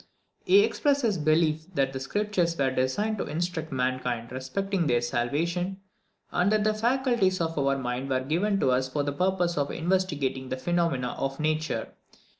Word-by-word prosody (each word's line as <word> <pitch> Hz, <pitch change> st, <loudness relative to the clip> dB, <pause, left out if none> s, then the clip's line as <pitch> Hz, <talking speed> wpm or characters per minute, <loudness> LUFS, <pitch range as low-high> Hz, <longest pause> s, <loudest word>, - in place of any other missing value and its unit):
He 390 Hz, +2 st, +7 dB
expresses 285 Hz, -9 st, +1 dB
his -, -, -3 dB
belief 155 Hz, 0 st, +2 dB
that 135 Hz, -2 st, +1 dB
the 130 Hz, -, -3 dB
Scriptures 175 Hz, +2 st, 0 dB
were 135 Hz, -1 st, +2 dB
designed 205 Hz, +13 st, 0 dB
to -, -, -2 dB
instruct 165 Hz, 0 st, -3 dB
mankind 125 Hz, -2 st, -2 dB
respecting 170 Hz, +8 st, -2 dB
their 120 Hz, -2 st, +3 dB
salvation, 165 Hz, +11 st, -1 dB, 0.5 s
and 180 Hz, +3 st, +2 dB
that 215 Hz, -1 st, +3 dB
the 215 Hz, 0 st, +2 dB
faculties 235 Hz, -4 st, +1 dB
of 165 Hz, -1 st, -1 dB
our 140 Hz, -1 st, +1 dB
minds 125 Hz, +1 st, -3 dB
were 130 Hz, -1 st, +2 dB
given 180 Hz, +9 st, 0 dB
us 130 Hz, 0 st, +2 dB
for 145 Hz, +2 st, -1 dB
the 145 Hz, 0 st, -2 dB
purpose 180 Hz, 0 st, 0 dB
of 140 Hz, 0 st, 0 dB
investigating 150 Hz, -7 st, -1 dB
the 130 Hz, -, -2 dB
phenomena 165 Hz, -4 st, 0 dB
of 135 Hz, +1 st, -2 dB
nature. 155 Hz, +1 st, -1 dB
160 Hz, 165 wpm, -27 LUFS, 130-190 Hz, 0.5 s, He